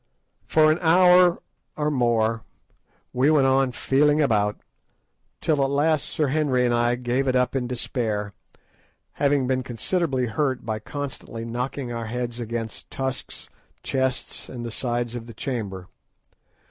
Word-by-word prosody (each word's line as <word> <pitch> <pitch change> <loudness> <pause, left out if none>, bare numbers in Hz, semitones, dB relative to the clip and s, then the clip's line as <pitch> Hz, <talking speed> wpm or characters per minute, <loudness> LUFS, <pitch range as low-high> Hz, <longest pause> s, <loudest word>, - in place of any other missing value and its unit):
For 155 -1 +5
an 155 - 0
hour 180 +1 +5 0.3
or 150 0 0
more 115 -4 +1 0.7
we 130 +4 +3
went 150 -4 +4
on 135 -1 +3
feeling 145 +4 +2
about, 105 -7 +2 0.8
till 150 -3 +2
at 135 - +1
last 145 +1 +1
Sir 150 -3 0
Henry 135 -4 +2
and 120 - +2
I 120 0 +2
gave 125 +2 -1
it 130 - +2
up 125 +1 +1
in 125 -2 -1
despair, 110 -4 -2 0.9
having 140 -2 +3
been 130 0 0
considerably 130 - -1
hurt 130 +3 -1
by 110 -1 -2
constantly 125 -3 -6
knocking 125 +2 -4
our 115 -1 -4
heads 120 0 -4
against 115 -3 -5
tusks, 130 -1 -5 0.4
chests, 130 -1 -2
and 120 -2 -6
the 115 - -5
sides 120 +1 -2
of 120 -1 -6
the 115 - -11
chamber. 100 -8 -4
125 Hz, 145 wpm, -24 LUFS, 115-140 Hz, 0.9 s, For